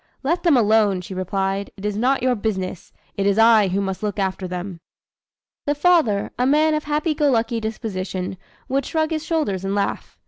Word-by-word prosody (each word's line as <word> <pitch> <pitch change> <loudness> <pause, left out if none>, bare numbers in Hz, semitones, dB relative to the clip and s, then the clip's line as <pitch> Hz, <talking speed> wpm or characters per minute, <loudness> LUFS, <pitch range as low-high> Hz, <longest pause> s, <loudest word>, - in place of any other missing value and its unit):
'Let 335 +6 0
them 330 -7 +4
alone,' 210 -4 +3
she 180 - -8
replied; 195 +1 -2
'it 195 - -8
is 210 -1 -1
not 250 +4 +1
your 255 -1 +3
business, 190 -5 -3 0.3
it 200 0 +1
is 200 0 +2
I 225 -2 +6
who 190 +2 -1
must 190 -1 -3
look 210 -2 -3
after 190 -1 -2
them.'" 180 0 -6 0.9
The 290 - +2
father, 290 - +2
a 250 - +2
man 305 +3 +3
of 305 0 -1
happy 300 +2 0
go 295 -1 +2
lucky 230 -2 +1
disposition, 190 -4 -4 0.3
would 275 +1 0
shrug 315 0 0
his 310 -1 -2
shoulders 305 - -1
and 195 +1 -1
laugh. 200 -1 -3
215 Hz, 195 wpm, -22 LUFS, 195-280 Hz, 0.9 s, I